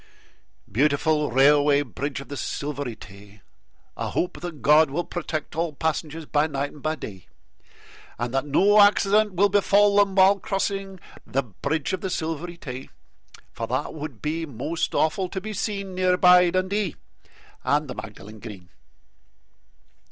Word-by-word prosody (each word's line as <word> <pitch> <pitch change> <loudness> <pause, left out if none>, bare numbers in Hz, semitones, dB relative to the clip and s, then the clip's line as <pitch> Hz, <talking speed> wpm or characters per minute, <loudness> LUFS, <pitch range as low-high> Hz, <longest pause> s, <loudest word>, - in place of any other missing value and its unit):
Beautiful 150 - +2
Railway 145 +2 +4
Bridge 135 +1 -5
of - - -12
the 145 - -5
Silvery 140 -3 -4
Tay! 100 0 -15 0.5
I - - -3
hope 180 - -2
that 170 -5 -7
God 150 +1 +6
will 165 +6 -2
protect 155 -4 -5
all 165 -1 -1
passengers 160 +1 -3
By 150 +1 +1
night 140 -1 -3
and 150 - -14
by 155 +2 -1
day, 95 - -9 0.9
And 120 +1 -3
that 135 +2 0
no 205 +8 +5
accident 205 0 +4
will 200 +3 +4
befall 205 +1 +4
them 200 -2 +3
while 195 +1 +5
crossing 195 0 -3 0.3
The 135 +1 0
Bridge 140 - -3
of 185 - -2
the 190 - -3
Silvery 165 0 -4
Tay, 130 -4 -8 0.6
For - - -5
that - - -2
would 150 -6 -8
be 160 +2 -2
most 145 +6 -3
awful 180 +4 +1
to 190 - -4
be 215 +3 -6
seen 200 -2 -3
Near 185 0 +2
by 180 -1 +6
Dundee 185 0 -1 0.7
and 150 +1 +1
the 125 - -5
Magdalen 105 0 -10
Green. 100 -6 -10
155 Hz, 150 wpm, -24 LUFS, 140-185 Hz, 0.9 s, God